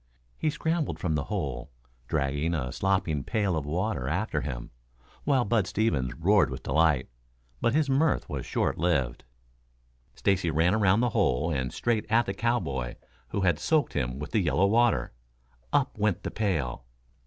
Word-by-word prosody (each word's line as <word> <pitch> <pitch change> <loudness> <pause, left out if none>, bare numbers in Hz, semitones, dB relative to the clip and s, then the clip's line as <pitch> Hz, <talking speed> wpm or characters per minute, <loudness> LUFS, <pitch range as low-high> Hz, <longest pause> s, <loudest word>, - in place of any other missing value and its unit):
He 155 - 0
scrambled 160 +1 -1
from 90 -5 -1
the 75 -2 -1
hole, 65 -3 -3 0.4
dragging 70 +5 0
a 65 -5 -2
slopping 95 -7 0
pail 100 - 0
of 75 -3 -3
water 90 - -1
after 80 0 -1
him, - - -5 0.5
while 135 -4 +3
Bud 105 -2 +1
Stevens 75 - 0
roared 90 -3 +3
with 65 +1 -7
delight. 80 -5 +2 0.5
But 115 - +2
his 155 -2 +3
mirth 140 +3 +2
was - - -4
short - - -1
lived. 75 -9 0 0.9
Stacy 95 -4 +1
ran 80 +3 +2
around 105 0 +3
the 125 - +2
hole 80 - +1
and 65 -4 -1
straight 115 -3 -1
at 115 +2 +4
the 95 - -2
cowboy 70 - -1 0.3
who 100 - -2
had 90 -5 +2
soaked 155 -3 +1
him 60 -2 -2
with 75 +2 -6
the 110 - +2
yellow 90 +2 +2
water. 110 - +2 0.6
Up 140 -2 +1
went 100 -2 +1
the - - -3
pail. 80 - -1
90 Hz, 165 wpm, -28 LUFS, 70-110 Hz, 0.9 s, at